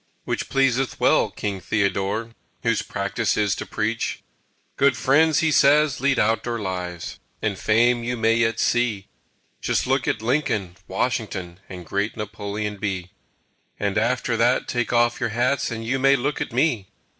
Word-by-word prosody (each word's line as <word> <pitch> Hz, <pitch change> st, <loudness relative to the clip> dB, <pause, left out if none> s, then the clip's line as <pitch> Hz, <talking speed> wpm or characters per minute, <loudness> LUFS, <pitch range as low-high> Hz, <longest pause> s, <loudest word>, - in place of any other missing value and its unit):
Which -, -, -3 dB
pleaseth 135 Hz, -1 st, +1 dB
well -, -, +3 dB
King 100 Hz, -2 st, -4 dB
Theodore, 100 Hz, +3 st, -1 dB, 0.3 s
Whose 115 Hz, -2 st, +1 dB
practice 100 Hz, +2 st, -1 dB
is 105 Hz, -3 st, +2 dB
to -, -, -5 dB
preach. 110 Hz, +2 st, -2 dB, 0.5 s
"Good 140 Hz, -3 st, +3 dB
friends," 155 Hz, +4 st, +3 dB
he 160 Hz, -1 st, +2 dB
says, 145 Hz, -1 st, +4 dB
"lead 140 Hz, -1 st, +2 dB
outdoor 115 Hz, +2 st, +1 dB
lives 90 Hz, -3 st, -5 dB, 0.2 s
And 105 Hz, -2 st, -1 dB
Fame 120 Hz, +4 st, +2 dB
you 120 Hz, +1 st, -2 dB
yet 115 Hz, 0 st, +3 dB
may -, -, -23 dB
see 115 Hz, -5 st, 0 dB, 0.5 s
Just -, -, 0 dB
look 130 Hz, -1 st, 0 dB
at 110 Hz, -, -1 dB
Lincoln, 110 Hz, -, 0 dB
Washington, 95 Hz, -4 st, -2 dB
And 90 Hz, -2 st, -8 dB
great 100 Hz, +7 st, -2 dB
Napoleon 105 Hz, 0 st, -4 dB
B.; 95 Hz, -3 st, -3 dB, 0.7 s
And 100 Hz, -2 st, -1 dB
after 120 Hz, +2 st, +1 dB
that 120 Hz, +3 st, +2 dB
take 120 Hz, -1 st, -1 dB
off 120 Hz, 0 st, +2 dB
your 120 Hz, -3 st, 0 dB
hats 125 Hz, +5 st, 0 dB
And 115 Hz, -1 st, -5 dB
you 130 Hz, +4 st, 0 dB
may 135 Hz, +1 st, +5 dB
look 140 Hz, +3 st, -2 dB
at -, -, -3 dB
me!" 120 Hz, -6 st, +1 dB
115 Hz, 155 wpm, -23 LUFS, 100-125 Hz, 0.7 s, may